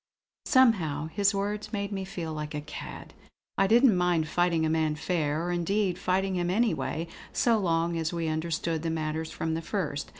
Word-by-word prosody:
Somehow 165 Hz, -, +3 dB
his 200 Hz, +3 st, +2 dB
words 210 Hz, +2 st, -2 dB
made 200 Hz, -2 st, -3 dB
me 195 Hz, -1 st, -3 dB
feel 175 Hz, -5 st, -5 dB
like 150 Hz, 0 st, -5 dB
a 150 Hz, -, -2 dB
cad. -, -, -8 dB, 0.4 s
I 195 Hz, -, +3 dB
didn't 235 Hz, 0 st, +6 dB
mind 175 Hz, -3 st, +2 dB
fighting 170 Hz, -1 st, +1 dB
a -, -, +1 dB
man 160 Hz, -1 st, +1 dB
fair; 155 Hz, -1 st, -1 dB
or 175 Hz, -, -1 dB
indeed 180 Hz, +1 st, 0 dB
fighting 190 Hz, +1 st, 0 dB
him 175 Hz, 0 st, 0 dB
anyway, 190 Hz, -5 st, 0 dB, 0.2 s
so 230 Hz, -2 st, +2 dB
long 170 Hz, -2 st, +1 dB
as 160 Hz, -1 st, -1 dB
we 170 Hz, -2 st, -2 dB
understood 160 Hz, 0 st, -1 dB
the 165 Hz, -, -2 dB
matter 160 Hz, 0 st, -2 dB
from 160 Hz, 0 st, -3 dB
the 165 Hz, -, -2 dB
first. 160 Hz, -5 st, -3 dB
170 Hz, 180 wpm, -28 LUFS, 160-195 Hz, 0.4 s, didn't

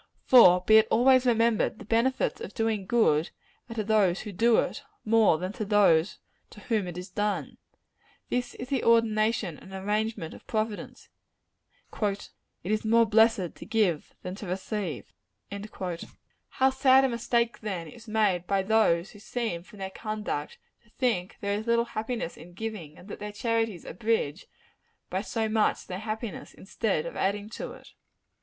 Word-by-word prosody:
For 180 Hz, -8 st, +7 dB
be 220 Hz, +4 st, +6 dB
it 220 Hz, 0 st, +5 dB
always 255 Hz, +2 st, +4 dB
remembered 230 Hz, -2 st, +2 dB
the 215 Hz, -, -11 dB
benefits 235 Hz, -, +1 dB
of 465 Hz, -, -7 dB
doing 220 Hz, -4 st, -1 dB
good 170 Hz, -10 st, +3 dB, 0.4 s
are 230 Hz, -, -7 dB
to 220 Hz, -, -1 dB
those 200 Hz, -4 st, +2 dB
who 210 Hz, -, -7 dB
do 225 Hz, +4 st, +3 dB
it, 285 Hz, -, -1 dB, 0.2 s
more 220 Hz, -6 st, +4 dB
than 185 Hz, +4 st, -4 dB
to 230 Hz, -2 st, -4 dB
those 195 Hz, -4 st, +3 dB, 0.3 s
to -, -, -14 dB
whom 215 Hz, -5 st, -1 dB
it 175 Hz, -1 st, -7 dB
is 180 Hz, +1 st, -7 dB
done. 205 Hz, +2 st, -2 dB, 0.7 s
This 245 Hz, 0 st, -2 dB
is 250 Hz, -, -7 dB
the 270 Hz, -3 st, 0 dB
ordination 220 Hz, -6 st, +2 dB
and 190 Hz, -, -14 dB
arrangement 205 Hz, -2 st, -2 dB
of -, -, -14 dB
Providence. 215 Hz, -1 st, -4 dB, 0.9 s
"It 200 Hz, -1 st, -2 dB, 0.3 s
is 215 Hz, +4 st, -1 dB
more 230 Hz, +1 st, +4 dB
blessed 220 Hz, -5 st, +3 dB
to -, -, -11 dB
give 195 Hz, -9 st, 0 dB
than 180 Hz, -, -5 dB
to 205 Hz, -, -7 dB
receive." 185 Hz, -, -4 dB, 0.4 s
How 200 Hz, +6 st, -4 dB
sad 265 Hz, 0 st, +5 dB
a -, -, +4 dB
mistake, 235 Hz, -1 st, 0 dB
then, 190 Hz, -6 st, -4 dB
is 230 Hz, +9 st, -13 dB
made 205 Hz, -5 st, +1 dB
by 195 Hz, -1 st, +1 dB
those 195 Hz, -4 st, +2 dB
who 205 Hz, -, -14 dB
seem 220 Hz, -5 st, -3 dB
from 200 Hz, +4 st, -16 dB
their 190 Hz, -1 st, -5 dB
conduct 210 Hz, -9 st, -4 dB, 0.3 s
to 210 Hz, -, -27 dB
think 220 Hz, -7 st, -1 dB
there 200 Hz, 0 st, -1 dB
is 220 Hz, -, -8 dB
little 235 Hz, 0 st, +3 dB
happiness 225 Hz, -4 st, -4 dB
in 175 Hz, +1 st, -13 dB
giving; 190 Hz, -7 st, -6 dB
and 185 Hz, -, -14 dB
that -, -, -8 dB
their 210 Hz, 0 st, -5 dB
charities 225 Hz, -3 st, -1 dB
abridge, 190 Hz, -5 st, -2 dB, 0.6 s
by 185 Hz, -, -1 dB
so 220 Hz, +1 st, -2 dB
much, 215 Hz, 0 st, +1 dB
their 180 Hz, 0 st, -5 dB
happiness, 215 Hz, 0 st, -6 dB
instead 195 Hz, -4 st, -2 dB
of -, -, -6 dB
adding 205 Hz, +2 st, -1 dB
to -, -, -6 dB
it. -, -, -15 dB
215 Hz, 165 wpm, -27 LUFS, 190-230 Hz, 0.9 s, For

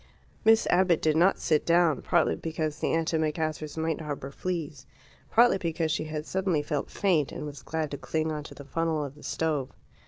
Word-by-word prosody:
Miss 225 Hz, 0 st, +5 dB
Abbott 180 Hz, -2 st, +4 dB
did 155 Hz, -1 st, +2 dB
not 180 Hz, +4 st, +4 dB
sit 155 Hz, -3 st, +1 dB
down, 170 Hz, -4 st, +3 dB
partly -, -, +2 dB
because 155 Hz, -2 st, -3 dB
the -, -, 0 dB
antimacassars 155 Hz, -1 st, -1 dB
might 160 Hz, 0 st, -1 dB
harbour 145 Hz, -3 st, -5 dB
fleas, 155 Hz, -5 st, -4 dB, 0.4 s
partly 235 Hz, -3 st, +5 dB
because 165 Hz, -2 st, -1 dB
she 155 Hz, -, -1 dB
had 155 Hz, -1 st, -4 dB
suddenly 185 Hz, -5 st, 0 dB
felt 145 Hz, -1 st, -2 dB
faint, 170 Hz, -8 st, +1 dB
and -, -, -6 dB
was 145 Hz, -1 st, -8 dB
glad 160 Hz, -2 st, -3 dB
to 145 Hz, -, -5 dB
cling 160 Hz, 0 st, -1 dB
on 150 Hz, -1 st, -4 dB
to -, -, -10 dB
the 140 Hz, -, -10 dB
funnel 160 Hz, 0 st, -1 dB
of 140 Hz, -, -8 dB
the 150 Hz, -, -16 dB
stove. 150 Hz, -5 st, -1 dB
160 Hz, 190 wpm, -28 LUFS, 150-165 Hz, 0.4 s, Miss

